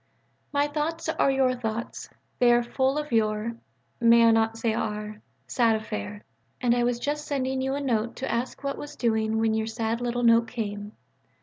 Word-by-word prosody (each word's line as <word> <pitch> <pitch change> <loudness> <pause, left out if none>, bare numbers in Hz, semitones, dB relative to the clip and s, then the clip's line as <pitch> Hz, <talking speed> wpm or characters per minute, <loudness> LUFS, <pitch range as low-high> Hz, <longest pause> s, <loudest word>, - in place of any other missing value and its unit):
_)... - - -42 0.5
My 285 0 +2
thoughts 310 +3 -3
are 320 - +2
your 265 -1 +2
thoughts; 235 -2 -5 0.3
they 245 -1 +5
are 240 0 +4
full 265 +3 0
of 300 -2 -4
your 215 0 +1 0.5
may 235 0 +6
I 230 - +6
not 225 0 +2
say 225 -1 0
our? 210 -1 -4 0.2
sad 230 -3 +2
affair. 210 -1 -5 0.4
And 245 -2 +2
I 240 - +1
was 240 0 +1
just 295 +4 -3
sending 265 -2 -1
you 265 +1 -1
a 285 - -3
note 235 -4 -1
to 265 - -3
ask 240 +4 -3
what 275 0 -3
was 290 0 -8
doing 220 -2 0
when 225 0 +2
your 220 0 -1
sad 225 +1 -2
little 245 0 -1
note 230 0 +5
came. 210 -3 -5
235 Hz, 195 wpm, -26 LUFS, 220-265 Hz, 0.5 s, may